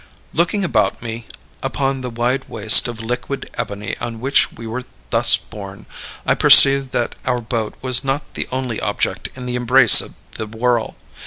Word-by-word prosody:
"Looking 175 +5 -1
about 110 - -1
me 115 0 -8 0.3
upon 135 0 -3
the 125 - -6
wide 120 +3 -3
waste 110 +1 +6
of 120 -2 -8
liquid 125 +4 -6
ebony 100 0 -6
on 115 -1 -7
which 135 +4 0
we 115 - -12
were 115 +3 -6 0.3
thus - - +4
borne, 100 -2 -12 0.4
I - - +1
perceived 135 -1 +6
that 120 - -2
our 125 -1 -2
boat 110 -2 -5
was 130 0 +1
not 135 +1 -4
the - - -5
only 130 -3 -4
object - - -4
in 130 -1 -9
the 125 0 -5
embrace 125 -1 +7
of - - -10 0.2
the 110 - -8
whirl. 115 +1 -2
120 Hz, 170 wpm, -17 LUFS, 115-130 Hz, 0.4 s, embrace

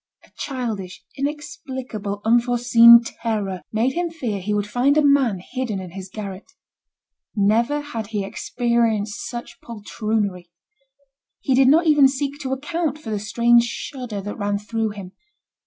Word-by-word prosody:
A - - -27
childish, 225 -9 -5
inexplicable, 260 -7 -5
unforeseen 235 0 +6
terror 210 -6 -3
made 230 +4 +1
him 345 0 -1
fear 240 - -4
he 205 +3 -3
would 205 -1 0
find 250 +7 +2
a 305 - +4
man 270 -9 +3
hidden 250 -6 -2
in 185 -2 -8
his 190 +1 -8
garret. 195 -1 -8 0.8
Never 230 +8 +2
had 230 -8 -6
he 205 -2 -3
experienced 225 -1 -1
such 240 -1 -8
poltroonery. 210 -4 -3 0.9
He 265 - 0
did 260 0 +5
not 320 +5 +5
even 295 -3 +6
seek 280 +1 -3
to 265 -3 -4
account 300 +2 -2
for 255 -8 -8
the 210 - -1
strange 235 +3 +3
shudder 240 -4 -6
that 205 +1 -6
ran 205 0 0
through 220 +2 -2
him. 200 -3 -9
235 Hz, 145 wpm, -22 LUFS, 205-265 Hz, 0.9 s, unforeseen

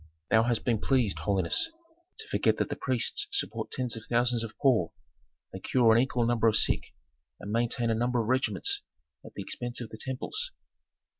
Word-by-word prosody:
"Thou 110 - +6
hast 120 0 0
been 115 -3 +2
pleased, 125 -6 +1
holiness, 100 - +1 0.5
to 445 - -9
forget - - +1
that - - -1
the - - -2
priests 415 - 0
support 400 - -2
tens 125 -3 -2
of 110 - -8
thousands 120 -1 +2
of 110 -1 -8
poor; 120 - +3 0.6
they - - -6
cure 120 -3 +3
an 115 - +5
equal 125 -2 0
number 115 -1 +2
of 110 - +3
sick, - - +1 0.4
and 100 - -7
maintain 115 +1 +1
a - - +3
number 120 +2 0
of 110 - -1
regiments 120 -7 +1 0.4
at - - -13
the - - -5
expense 120 0 -5
of 120 -3 -6
the 110 - -9
temples." 425 - -4
120 Hz, 190 wpm, -29 LUFS, 110-125 Hz, 0.6 s, Thou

